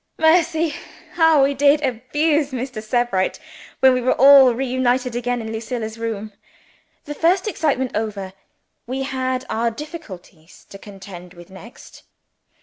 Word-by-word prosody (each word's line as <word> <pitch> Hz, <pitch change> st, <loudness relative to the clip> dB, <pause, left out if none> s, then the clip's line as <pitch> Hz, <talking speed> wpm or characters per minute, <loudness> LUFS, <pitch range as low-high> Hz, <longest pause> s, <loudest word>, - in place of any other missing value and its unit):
Mercy! 320 Hz, -1 st, +2 dB, 0.4 s
how 325 Hz, -4 st, +4 dB
we 275 Hz, +1 st, +2 dB
did 285 Hz, +2 st, +3 dB
abuse 290 Hz, +4 st, 0 dB
Mr. 255 Hz, -3 st, -5 dB
Sebright, 215 Hz, -4 st, -1 dB, 0.4 s
when 265 Hz, -1 st, +6 dB
we 250 Hz, -, 0 dB
were 250 Hz, -, +1 dB
all 270 Hz, -2 st, +7 dB
reunited 250 Hz, -1 st, -1 dB
again 245 Hz, 0 st, -2 dB
in 220 Hz, 0 st, -6 dB
Lucilla's 225 Hz, 0 st, -5 dB
room! 215 Hz, -2 st, -5 dB, 0.7 s
The 295 Hz, -, -6 dB
first 355 Hz, +6 st, +1 dB
excitement 275 Hz, -, -1 dB
over, 205 Hz, -3 st, -4 dB, 0.5 s
we 265 Hz, +2 st, -3 dB
had 260 Hz, -1 st, -3 dB
our 230 Hz, +1 st, -1 dB
difficulties 215 Hz, -, -11 dB
to 195 Hz, -, -11 dB
contend 190 Hz, -3 st, -12 dB
with 175 Hz, +2 st, -15 dB
next. 195 Hz, +5 st, -14 dB
250 Hz, 135 wpm, -20 LUFS, 220-285 Hz, 0.7 s, all